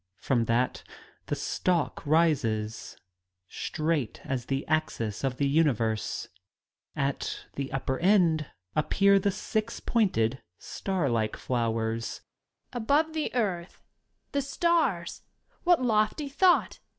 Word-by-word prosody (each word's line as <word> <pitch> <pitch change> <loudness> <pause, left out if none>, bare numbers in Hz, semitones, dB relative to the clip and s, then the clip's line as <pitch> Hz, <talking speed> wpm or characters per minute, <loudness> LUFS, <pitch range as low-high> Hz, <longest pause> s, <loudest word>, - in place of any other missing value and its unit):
From 120 +1 +1
that 120 +3 +1 0.5
the - - -1
stalk 170 -7 -1
rises, 115 -9 +1 0.5
straight 155 - -2
as 130 -3 -2
the 135 0 -2
axis 145 -9 -1
of 130 -2 -1
the 140 - +1
universe. 120 -8 +1 0.7
At 140 0 -2
its 140 -1 -4
upper 130 -1 -2
end 170 -5 +3 0.3
appear 195 +6 +4
the 200 - +1
six 215 +2 -2
pointed, 130 - +1 0.2
starlike 130 - -1
flowers. 115 -2 -2 0.5
Young 245 - -2
Lady. - - -6
Above 310 +6 +2
the 310 -5 -2
earth 190 -7 -2 0.2
— - - -47
^the 280 - +2
stars! 280 - 0 0.4
What 345 -6 +4
lofty 220 +5 +1
thought 355 +6 +3
155 Hz, 115 wpm, -28 LUFS, -, 0.7 s, appear